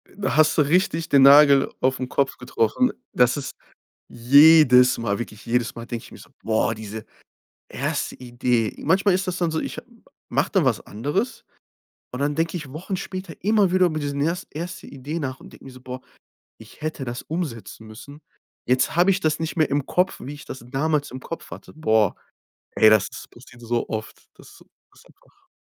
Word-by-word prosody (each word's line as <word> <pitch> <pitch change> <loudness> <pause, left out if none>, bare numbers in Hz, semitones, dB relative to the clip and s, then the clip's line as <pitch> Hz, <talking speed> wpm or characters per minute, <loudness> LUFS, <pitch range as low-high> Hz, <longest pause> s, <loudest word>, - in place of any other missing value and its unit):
Da 200 0 -2
hast 155 0 +4
du - - +5
richtig 165 +1 0
den 140 - +5
Nagel 140 0 +7
auf'n 130 0 0
Kopf 135 +1 -1
getroffen 125 - 0 0.2
das 125 +3 +3
ist 140 - -6 0.5
jedes 130 0 +6
Mal 110 -3 -2
wirklich 110 -2 -8
jedes 120 0 0
Mal 115 - -8
denk 115 -1 -6
ich - - -15
mir - - -12
so: - - -15
„Boah, 110 +1 0
diese 110 0 -8 0.6
erste - - -3
Idee!” 120 -2 -1
Manchmal 190 +4 +3
ist 185 +2 -1
das 185 0 -2
dann 170 -2 0
so, 160 - -1
ich - - -5
ha - - -5 0.5
mache - - 0
dann - - +2
was - - +1
anderes, 145 - -3 0.7
und 125 - -6
dann 145 +1 0
denke 165 +2 -1
ich 150 -5 -9
Wochen 180 +6 -5
später 185 -2 -6
immer 205 -2 +3
wieder 185 -1 +4
über 155 -2 -3
diesen 140 -1 -3
erst 170 +5 -1
erste 175 +3 -6
Idee 145 +4 -6
nach 130 -3 -4
und - - -14
denke - - -16
mir 135 - -10
so: 130 0 -14
„Boah, 130 0 -8 0.6
ich 110 +7 -16
hätte 155 -3 -4
das 120 0 -5
umsetzen 115 - -6
müssen. 140 +7 -12 0.4
Jetzt 130 +5 +1
habe 180 +3 +4
ich 195 - 0
das 155 -4 0
nicht 160 +2 -4
mehr 155 -2 +2
im 140 0 -1
Kopf, 180 +1 0
wie 140 - -7
ich 145 - -13
das 130 - -9
damals 145 +2 -1
im 130 - -7
Kopf 165 +5 -8
hatte.“ - - -11
Boah, 110 - +2 0.6
ey, 110 - +5
das 110 -2 +4
ist - - -11
passiert 120 0 -17
so 120 0 -2
oft. 110 -1 -7
Das - - -17
ist - - -17 0.4
einfach - - -27
140 Hz, 195 wpm, -23 LUFS, 120-165 Hz, 0.7 s, Nagel